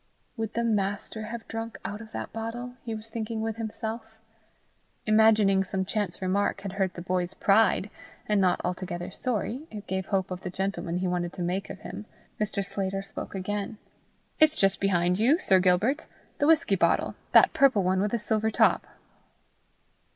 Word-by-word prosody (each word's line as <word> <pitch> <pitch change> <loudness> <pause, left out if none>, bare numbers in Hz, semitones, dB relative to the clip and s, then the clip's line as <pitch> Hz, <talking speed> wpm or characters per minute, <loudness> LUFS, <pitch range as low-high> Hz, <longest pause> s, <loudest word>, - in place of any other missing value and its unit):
Would 225 -2 -4
the 235 - +1
Master 215 0 -1
have 230 0 -7
drunk 225 -2 -5
out 210 +1 -4
of 220 -1 -11
that - - -6
bottle? 230 +2 -5
he 225 -2 -4
was 220 +1 -10
thinking 220 0 -3
with 220 0 -2
himself. 220 0 -5 0.9
Imagining 215 -3 +5
some 190 0 -2
chance 195 -2 -3
remark 200 +2 0
had 195 - -5
hurt 190 -1 -1
the 175 - -6
boy's 180 -1 -1
pride, 205 0 +3 0.4
and 210 -2 +3
not 185 -1 +3
altogether 180 0 -4
sorry 250 +6 -3
it 210 -2 -8
gave 190 0 -3
hope 190 -2 0
of 180 0 -4
the 185 - -4
gentleman 185 -2 -2
he 185 +1 -1
wanted 175 -1 -1
to 180 - -4
make 180 +3 -1
him 210 - -8 0.3
Mr. 205 -2 -1
Sclater 195 0 -3
spoke 195 - -7
again: 205 +3 -3 0.6
"It's 310 0 +5
just 195 -7 +2
behind 180 -1 +2
you, 260 +9 +5
Sir 190 - +4
Gilbert 195 - +2 0.3
the 290 - +3
whisky 320 -10 +4
bottle 190 - +2 0.2
that - - +7
purple 260 -8 +4
one 185 +1 +2
with 205 - +1
the 235 - 0
silver 220 0 0
top." - - +3
205 Hz, 175 wpm, -27 LUFS, 190-225 Hz, 0.9 s, that